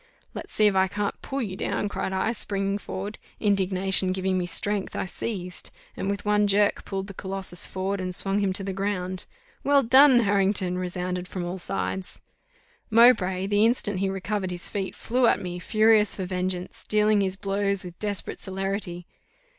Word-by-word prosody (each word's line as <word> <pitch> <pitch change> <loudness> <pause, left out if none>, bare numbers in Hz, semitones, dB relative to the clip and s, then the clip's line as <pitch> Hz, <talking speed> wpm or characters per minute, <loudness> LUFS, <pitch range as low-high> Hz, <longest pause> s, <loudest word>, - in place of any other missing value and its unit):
"Let's - - -7
see 215 - +3
if 205 - +5
I 190 0 +3
can't 205 +1 -3
pull 275 -1 -3
you 190 -4 -5
down!" 205 - -2
cried 195 - -3
I, 190 +4 0
springing 200 -3 -1
forward: 200 +2 -6 0.2
indignation 190 -2 +2
giving 190 0 -1
me 180 -1 -1
strength, 205 +2 -1
I - - -2
seized, 185 -2 -5 0.3
and 195 - -3
with 200 +1 -3
one 210 0 +3
jerk 205 +1 +2
pulled 195 -1 -3
the 200 - -9
Colossus 190 -2 -1
forward 190 +1 -3
and 185 -1 -1
swung 195 +1 +1
him 200 -2 +1
to 195 - +1
the 195 0 -3
ground. 185 -2 -3 0.4
"Well 280 -1 +4
done, 260 +1 +7
Harrington!" 195 -3 +2
resounded 180 0 -3
from 180 -1 -5
all 180 +2 -4
sides. 185 +1 -3 0.7
Mowbray, 215 -5 +5
the 205 +1 +2
instant 220 -4 +2
he 195 0 0
recovered 195 0 -2
his 175 -1 -1
feet, 195 -2 -4
flew 245 +1 +1
at - - +3
me, 180 -1 -5
furious 215 +1 +3
for 190 - -3
vengeance, 180 0 -3
dealing 210 -1 +3
his 190 -1 0
blows 200 0 -1
with 175 -1 -10
desperate 205 -2 -3
celerity. 190 -2 -3
195 Hz, 180 wpm, -25 LUFS, 185-205 Hz, 0.7 s, done